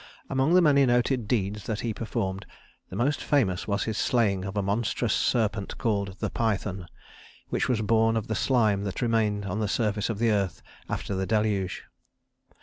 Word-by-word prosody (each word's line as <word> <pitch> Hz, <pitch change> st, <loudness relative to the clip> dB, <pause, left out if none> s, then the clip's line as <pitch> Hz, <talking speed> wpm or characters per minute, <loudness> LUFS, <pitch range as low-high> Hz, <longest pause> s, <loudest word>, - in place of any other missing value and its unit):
Among 135 Hz, +6 st, +3 dB
the 180 Hz, -, +6 dB
many 140 Hz, -3 st, +5 dB
noted 120 Hz, -1 st, +1 dB
deeds 105 Hz, -3 st, -1 dB
that 110 Hz, -2 st, -2 dB
he 115 Hz, -2 st, -2 dB
performed, 100 Hz, -3 st, -3 dB, 0.4 s
the -, -, -8 dB
most 135 Hz, +7 st, 0 dB
famous 110 Hz, -, +1 dB
was 100 Hz, -1 st, 0 dB
his 110 Hz, -2 st, -2 dB
slaying 100 Hz, -6 st, +1 dB
of 100 Hz, +1 st, -5 dB
a 100 Hz, -, +1 dB
monstrous 110 Hz, +2 st, 0 dB
serpent 110 Hz, -4 st, 0 dB
called 100 Hz, -4 st, -1 dB
the -, -, -3 dB
Python, 100 Hz, -5 st, -2 dB, 0.6 s
which -, -, -1 dB
was 120 Hz, -4 st, +1 dB
born 115 Hz, +1 st, +3 dB
of 110 Hz, -, -2 dB
the 110 Hz, -, -3 dB
slime 110 Hz, -5 st, +2 dB
that 100 Hz, +3 st, -3 dB
remained 110 Hz, -3 st, +1 dB
on 100 Hz, +2 st, -3 dB
the 105 Hz, -, 0 dB
surface 105 Hz, 0 st, 0 dB
of 110 Hz, -, -2 dB
the 115 Hz, +1 st, +2 dB
earth 100 Hz, -4 st, -1 dB, 0.3 s
after -, -, -3 dB
the 95 Hz, 0 st, -2 dB
Deluge. 105 Hz, -4 st, 0 dB
110 Hz, 180 wpm, -27 LUFS, 100-115 Hz, 0.6 s, the